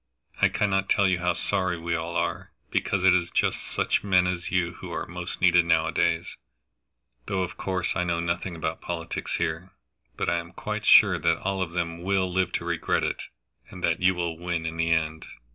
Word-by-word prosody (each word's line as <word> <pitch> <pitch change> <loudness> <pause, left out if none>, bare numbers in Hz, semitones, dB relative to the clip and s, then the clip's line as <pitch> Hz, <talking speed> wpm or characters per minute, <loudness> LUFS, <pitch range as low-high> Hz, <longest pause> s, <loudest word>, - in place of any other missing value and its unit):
I - - +6
cannot 95 -1 0
tell 100 - +4
you 90 -2 +1
how 90 0 +1
sorry 95 -4 -1
we 85 +1 -3
all 85 +1 -3
are, 85 0 -2 0.2
because 95 -2 0
it 95 -1 +6
is 90 -1 +1
just - - +1
such - - 0
men 95 -3 +4
as 90 -1 -2
you 85 -1 +1
who - - -8
are - - -3
most 90 +1 -6
needed 90 -1 +5
nowadays, 80 -1 +1 0.9
though 95 -2 0
of 90 - -5
course 95 -2 -2
I 90 - +1
know 85 -1 0
nothing 85 +1 -2
about 80 0 -3
politics 85 -1 -4
here. 85 +3 -3 0.4
But - - -1
I 85 - +2
am 85 0 -10
quite - - -4
sure - - +7
that - - +1
all 95 0 -1
of 85 -2 -3
them 85 -1 -2
will 95 -1 0
live 90 -1 +1
to 85 - -2
regret 85 -2 0
it, - - -2 0.5
and - - -10
that - - +1
you 90 0 +4
will 85 -2 -3
win 85 -2 -2
in 80 0 -4
the 80 0 +1
end. 80 -1 0
85 Hz, 205 wpm, -26 LUFS, 85-90 Hz, 0.9 s, sure